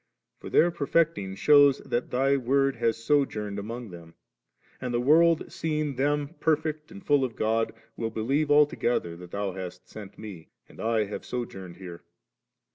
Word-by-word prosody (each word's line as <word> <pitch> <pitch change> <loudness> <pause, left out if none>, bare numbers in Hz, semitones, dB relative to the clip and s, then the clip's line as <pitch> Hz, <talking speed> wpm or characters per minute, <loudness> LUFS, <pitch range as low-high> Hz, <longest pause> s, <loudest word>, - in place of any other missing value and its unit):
For - - -8
their 175 - +4
perfecting 155 - 0
shews 145 +3 +6
that 120 - -2
Thy 135 +2 +2
Word 135 +1 +1
has 115 -1 +1
sojourned 110 -7 0
among 115 +1 -7
them; 85 -1 -12 0.7
and 125 -1 -3
the 120 - 0
world 160 +5 +4
seeing 155 -3 -2
them 145 +2 0
perfect 155 -1 -1
and 195 +1 -12
full 145 -2 +3
of 125 -3 -3
God', 115 +1 0 0.2
will 115 - -3
believe 135 +7 -1
altogether 140 - +2
that 90 0 -11
Thou 100 +1 -3
hast 90 -1 -8
sent 105 -3 -11
Me, 100 -7 -10 0.2
and - - -17
I 110 -1 +1
have 105 0 -6
sojourned 95 -8 -6
here. 90 -3 -9
125 Hz, 160 wpm, -27 LUFS, 105-145 Hz, 0.7 s, shews